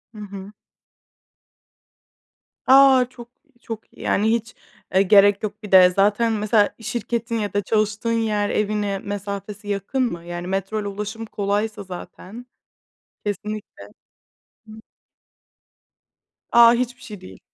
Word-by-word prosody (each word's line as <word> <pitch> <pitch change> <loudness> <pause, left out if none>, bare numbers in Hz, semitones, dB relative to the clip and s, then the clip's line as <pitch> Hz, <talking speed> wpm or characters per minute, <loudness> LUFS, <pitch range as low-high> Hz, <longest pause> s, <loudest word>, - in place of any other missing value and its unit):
Hı - - -11
hı. 200 -1 -9 2.2
A! 265 -1 +7
Çok, 240 -2 -13 0.3
çok 225 -1 -8
iyi. - - -15
Yani, 215 +2 +1
hiç, 230 0 -2 0.4
eee, 190 - +5
gerek 200 +1 +5
yok. 215 +1 -5
Bir 210 - -9
de 185 -1 +8
zaten 205 +5 +2
mesela 210 0 +1
şirketin 235 0 -3
ya 205 -3 -3
da 205 - +1
çalıştığın 215 +2 -1
yer 210 -2 0
evine 205 -2 -1
mesafesi 200 +1 -6
yakın 205 +6 -1
mı? 170 0 -7
Yani, 175 +1 -6
metroyla 195 +2 -2
ulaşım 210 +3 -6
kolaysa 205 0 -2
zaten. 190 +4 -10 0.8
Kesinlikle. 205 - -5 0.9
Hıı. 215 0 -11 1.7
A! 235 0 +7
Hiçbir 250 +1 -2
şey 215 -6 -10
değil. 95 0 -13
210 Hz, 120 wpm, -22 LUFS, 200-225 Hz, 2.2 s, de